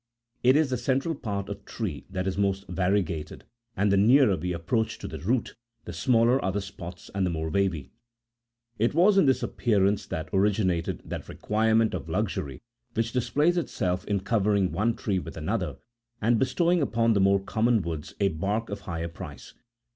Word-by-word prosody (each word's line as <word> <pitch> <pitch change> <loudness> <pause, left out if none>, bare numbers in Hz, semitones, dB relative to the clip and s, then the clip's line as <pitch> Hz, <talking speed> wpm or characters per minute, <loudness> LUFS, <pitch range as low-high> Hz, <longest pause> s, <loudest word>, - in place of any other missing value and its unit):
It 130 +2 +5
is 150 -3 +3
the 125 - +1
central 135 +6 0
part 100 -8 -4
of - - -7
trees 75 - -5
that 95 -1 -3
is 95 - -1
most 100 -1 0
variegated, 90 -3 -1 0.3
and' 100 +1 +2
the 100 - +4
nearer 120 +1 +5
we 90 +2 -3
approach 110 +6 -1
to - - -7
the - - -7
root 115 - -1 0.3
the - - -6
smaller 120 +1 +3
are 95 - +1
the 100 - -1
spots 90 -3 -9
and 100 -1 0
the 90 - +1
more 80 -1 -3
wavy. 90 -7 0 0.9
It 115 +6 +1
was 195 +4 +5
in 155 - +4
this 130 - +2
appearance 100 -3 +1
that 80 - -4
originated 95 -3 +1
that - - -6
requirement 110 +1 +1
of - - -5
luxury 65 -3 -2 0.3
which 115 +1 0
displays 140 +8 +2
itself 90 - -1
in 100 -2 -1
covering 100 -2 +1
one 110 +7 +1
tree 100 -3 -1
with - - -8
another, 85 -2 -2 0.4
and 115 +1 +2
bestowing 170 +7 +2
upon 115 -4 +2
the 100 - +2
more 100 0 +4
common 110 +2 +1
woods 80 -3 -5
a 100 -1 +3
bark 100 +7 -2
of 100 - -4
higher 85 -4 -4
price. 85 -3 -10
100 Hz, 180 wpm, -27 LUFS, 90-115 Hz, 0.9 s, It